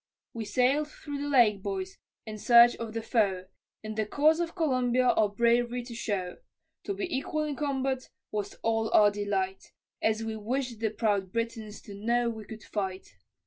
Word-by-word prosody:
We 225 -2 -4
sailed 265 +7 +2
through 290 -1 -7
the 290 - -2
lake, 230 -8 +4
boys, 190 -1 -4 0.3
in 215 -1 -7
search 235 +2 +7
of 225 -2 -6
the 225 0 -3
foe, 200 -6 +1 0.4
In 215 0 -5
the 215 -1 -1
cause 310 +7 +3
of 340 +1 -2
Columbia 255 -6 +2
our 215 -2 +3
brav'ry 235 +3 +1
to 240 - -8
show, 195 -6 -3 0.5
To 400 - -2
be 380 -5 -3
equal 305 +3 -1
in 300 -2 -3
combat 270 -2 -2 0.2
was 210 -2 -3
all 225 -1 +1
our 205 -1 +7
delight, 200 -2 -3 0.3
As 220 0 +1
we 225 0 -3
wished 240 +2 -3
the 220 -1 0
proud 205 -3 0
Britons 225 -2 -4
to 205 - -10
know 235 +4 0
we 220 -2 -8
could 220 0 -10
fight. 190 -2 -4
225 Hz, 180 wpm, -29 LUFS, 210-255 Hz, 0.5 s, search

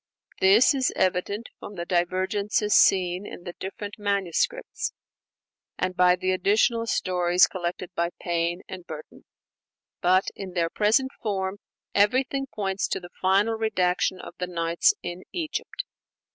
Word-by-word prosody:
This 200 +9 +6
is 265 -2 +1
evident 190 +4 0
from 205 - -9
the 170 -1 -4
divergences 190 +4 0
seen 180 0 +4
in - - -9
the 175 - -6
different 205 +2 -6
manuscripts, 210 - -1 0.8
and 185 0 -1
by 180 0 +5
the 185 +1 -1
additional 220 +5 +2
stories 180 -3 +3
collected 180 0 -5
by 170 -1 0
Payne 170 +1 -1
and 185 -2 -8
Burton. 155 -2 -10 0.8
But 185 +2 +3
in 190 -2 -7
their 170 -2 0
present 225 +6 +2
form, 195 -2 -2 0.3
everything 260 +6 +2
points 195 -2 -1
to - - -2
the 175 -1 -12
final 195 +4 +3
redaction 190 -4 0
of - - -9
the 180 - -2
'Nights' 170 -1 +2
in 175 +1 -5
Egypt. 340 +8 -3
190 Hz, 135 wpm, -26 LUFS, 180-210 Hz, 0.8 s, This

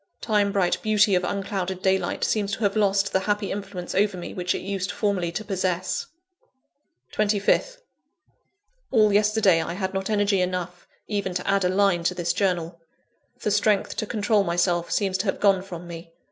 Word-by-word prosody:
Time 205 -2 +1
bright 190 -3 +1
beauty 210 -1 +3
of 180 0 +2
unclouded 190 -1 -3
daylight 190 0 0
seems 205 -2 0
to 220 - -4
have 200 0 +1
lost 200 -1 +2
the 190 - +3
happy 205 +1 -1
influence 195 -3 -5
over 200 0 +1
me 175 - -7
which 180 -1 -1
it - - -4
used 195 0 -3
formerly 185 -3 -1
to 215 +6 -5
possess. 185 -2 -2 1.1
25th. 215 - +1 1.1
All 215 -5 +4
yesterday 205 -4 +3
I 160 - -4
had 190 +1 -3
not 190 +1 -3
energy 205 -2 +2
enough 180 -1 -3 0.2
even 200 -4 -2
to 180 - -3
add 195 -1 +2
a 180 - +2
line 190 -2 +2
to 180 - +1
this 170 -1 -1
journal. 175 -3 -1 0.6
The 210 - 0
strength 205 0 +1
to 215 - -2
control 210 -2 +1
myself 175 -1 0
seems 195 -2 0
to 205 - -1
have 190 - -1
gone 195 -2 +3
from 175 -3 -8
me. 165 0 -9
195 Hz, 175 wpm, -24 LUFS, 180-205 Hz, 1.1 s, All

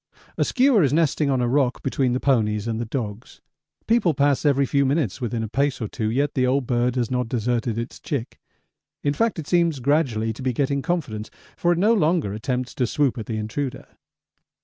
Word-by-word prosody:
A - - -3
skua 255 -5 +3
is 135 - +2
nesting 150 -1 +2
on 130 -2 +1
a 120 - +1
rock 130 0 +1
between 130 -2 0
the 125 - 0
ponies 110 -6 +1
and 115 0 -2
the - - -2
dogs. 110 -2 -5 0.5
People 220 -9 +2
pass 140 0 +2
every 140 -1 +3
few 140 +1 +2
minutes 135 - 0
within 115 -1 -2
a - - -3
pace 140 +5 0
or 110 - -3
two, 110 0 -3
yet 140 +5 0
the 130 -2 +1
old 135 +1 +1
bird 120 0 +1
has 120 -2 -1
not 125 -2 -1
deserted 120 -1 -1
its 115 +1 -5
chick. 135 -6 -4 0.6
In 145 - +1
fact, 230 +4 0
it 160 - -5
seems 170 -5 +2
gradually 125 -5 +1
to 110 - -10
be 130 -1 0
getting 140 +2 0
confidence, 140 -11 -3 0.3
for 175 - +1
it 175 - +2
no 210 +6 +4
longer 160 - +1
attempts 125 +3 -3
to 125 - 0
swoop 140 0 +1
at 110 - -6
the 110 - -3
intruder. 120 +5 -4
130 Hz, 210 wpm, -23 LUFS, 115-145 Hz, 0.6 s, no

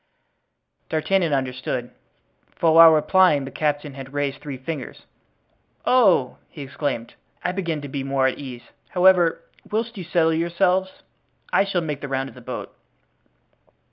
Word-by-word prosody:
D'Artagnan 170 +2 +1
understood, 130 -2 -2 0.6
for 165 -1 +2
while 165 0 +10
replying 155 -1 +4
the 135 - -8
captain 145 -1 -2
had 135 0 -10
raised 145 -1 -2
three 145 -3 -6
fingers. 135 +1 -7 0.8
"Oh!" 195 - +3
he 145 - -9
exclaimed, 130 -4 -4 0.3
"I - - 0
begin 170 -5 -3
to - - -5
be 135 0 -4
more 135 -1 0
at 130 - +1
my - - -7
ease, 125 -3 -8 0.3
however, 180 -2 +4 0.3
whilst 225 0 -3
you - - -5
settle 165 -1 +2
yourselves, 180 +3 0 0.5
I - - +4
shall 190 -3 -1
make 150 -3 -4
the 145 - -5
round 135 0 -2
of - - -15
the 125 - -13
boat." - - -7
150 Hz, 150 wpm, -23 LUFS, 135-175 Hz, 0.8 s, while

